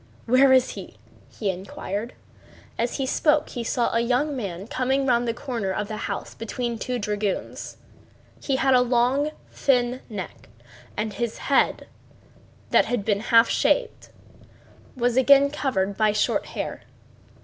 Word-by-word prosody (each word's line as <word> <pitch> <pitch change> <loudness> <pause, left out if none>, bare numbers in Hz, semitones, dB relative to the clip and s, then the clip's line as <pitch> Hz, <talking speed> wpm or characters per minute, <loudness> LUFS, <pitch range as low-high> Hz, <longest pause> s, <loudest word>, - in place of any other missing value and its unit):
"Where 260 +3 +5
is 260 -1 +4
he?" - - -9 0.3
he 205 -4 -2
inquired. 200 +4 -5 0.6
And 235 +1 0
as - - -7
he 270 - -1
spoke 300 +3 +2
he 240 - -5
saw 235 +1 0
a 230 - +2
young 255 +5 +1
man 195 -6 -5
coming 265 +3 0
round 240 -2 +2
the - - +2
corner 235 -8 -3
of 205 +2 -2
the 215 - -4
house - - -5
between 235 +1 -4
two 250 +2 -2
dragoons. 210 -2 -3 0.6
He 275 - 0
had 265 0 +3
a 250 - +6
long 250 +4 +2 0.2
thin 250 -1 +1
neck, 195 - -8 0.5
and 215 0 -2
his 235 +1 -3
head, 280 - +1 0.9
that - - +5
had 240 -5 -2
been 205 -2 +1
half 230 +1 +5
shaved, - - 0 0.9
was 245 0 +1
again 280 +2 +6
covered 205 -10 -1
by 215 -1 +3
short 210 - 0
hair. - - -5
240 Hz, 150 wpm, -24 LUFS, 215-260 Hz, 0.9 s, a